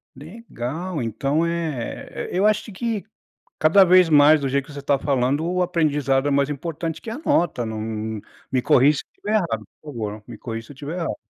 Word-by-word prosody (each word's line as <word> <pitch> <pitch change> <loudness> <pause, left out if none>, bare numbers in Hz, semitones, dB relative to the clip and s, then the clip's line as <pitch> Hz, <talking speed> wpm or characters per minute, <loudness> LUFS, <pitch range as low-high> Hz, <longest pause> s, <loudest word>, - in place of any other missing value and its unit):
Legal, 165 - -6
então 135 +8 0
é 165 -7 -4
e - - -1
eu 195 - +3
acho 215 +1 0
que 220 +1 -3 0.5
cada 165 +6 +6
vez 185 -2 +6
mais 150 +1 +7
do 140 - -2
jeito 135 0 0
que - - -11
você 140 - -7
tá 140 0 +2
falando, 135 +1 0
o 180 +1 0
aprendizado 145 -5 +1
é - - +1
mais 140 +1 +2
importante 165 +2 -4
que 225 - -7
a 230 - -5
nota, 170 - +1
não 110 -1 -4
não 110 -1 -4 0.3
me 130 -1 +1
corrige 140 +4 +4
se - - -7
estiver 210 - -6
errado, 135 - -1 0.2
por 150 -1 -9
favor, 105 -2 -5
me 115 - -9
corrige 115 0 -6
se 145 - -11
estiver 145 +5 -6
errado. 165 - -3
145 Hz, 200 wpm, -22 LUFS, 130-170 Hz, 0.5 s, mais